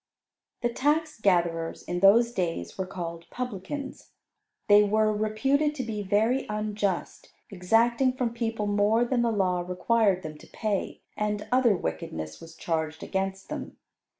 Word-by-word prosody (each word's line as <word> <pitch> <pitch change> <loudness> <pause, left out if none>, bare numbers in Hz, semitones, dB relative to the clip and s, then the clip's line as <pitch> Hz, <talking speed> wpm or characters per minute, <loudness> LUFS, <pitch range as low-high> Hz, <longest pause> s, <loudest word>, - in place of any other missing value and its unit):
The 240 - +1
tax 300 +3 0
gatherers 170 -4 +1
in 175 0 -3
those 225 +5 +6
days 165 - -3
were 190 - -3
called 170 -2 -6
Publicans. 250 +3 -6 0.6
They 205 0 +8
were 215 +1 +2
reputed 270 +8 +1
to 260 - -3
be 220 -3 -4
very 220 +6 +1
unjust, 210 -3 -2 0.2
exacting 230 +7 +2
from 250 -2 -2
people 225 -2 -2
more 205 +3 +2
than 240 0 +1
the 235 -1 +2
law 185 -4 +1
required 185 +2 +1
them 155 -1 -7
to - - -15
pay, 210 -3 -3
and 210 -1 -2
other 250 -4 +4
wickedness 80 - -5
was 165 0 -12
charged 160 -1 -3
against 190 0 -3
them. - - -6
210 Hz, 145 wpm, -27 LUFS, 180-235 Hz, 0.6 s, They